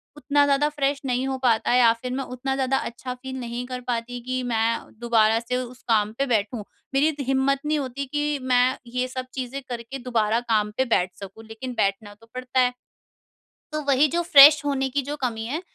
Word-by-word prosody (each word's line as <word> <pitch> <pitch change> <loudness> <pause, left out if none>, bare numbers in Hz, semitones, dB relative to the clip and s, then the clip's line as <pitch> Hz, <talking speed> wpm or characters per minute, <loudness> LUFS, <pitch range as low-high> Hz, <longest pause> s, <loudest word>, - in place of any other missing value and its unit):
उतना 290 -1 +2
ज़्यादा 285 +1 +2
फ्रेश 280 -2 -1
नहीं 255 +1 0
हो 265 -1 -2
पाता 230 -2 +2
है 250 - +4
या 235 -2 +6
फिर 250 -1 -4
मैं 270 +1 -2
उतना 260 +2 -4
ज़्यादा 270 0 +1
अच्छा 250 +2 -5
फील 260 +1 -8
नहीं 240 0 -5
कर 250 -1 -5
पाती 245 0 -3
कि 255 +1 -3
मैं 225 -1 -1
दोबारा 225 -2 +3
से 245 +2 -4
उस 250 0 -7
काम 215 -2 +2
पे 275 - +1
बैठूँ। 220 -2 -1 0.3
मेरी 280 +3 +3
इत 315 - -1
हिम्मत 270 +1 +2
नहीं 305 0 +1
होती 275 +1 -4
कि 295 +1 -2
मैं 255 0 +2 0.2
ये 250 0 0
सब 255 0 -5
चीज़ें 260 +1 -5
करके 240 +2 -6
दोबारा 230 -2 0
काम 215 -3 0
पे 260 - +2
बैठ 180 -6 0
सकूँ 200 +3 -10
लेकिन 245 +3 -7
बैठना 200 +1 -1
तो 225 +2 -21
पड़ता 255 0 -2
है। 250 0 +3 1.0
तो 305 0 -2
वही 280 +2 +4
जो 345 - +2
फ्रेश 300 -2 +8
होने 270 -2 0
की 280 +2 -1
जो - - -2
कमी 225 -2 -3
है 300 +8 -3
255 Hz, 210 wpm, -24 LUFS, 230-275 Hz, 1.0 s, फ्रेश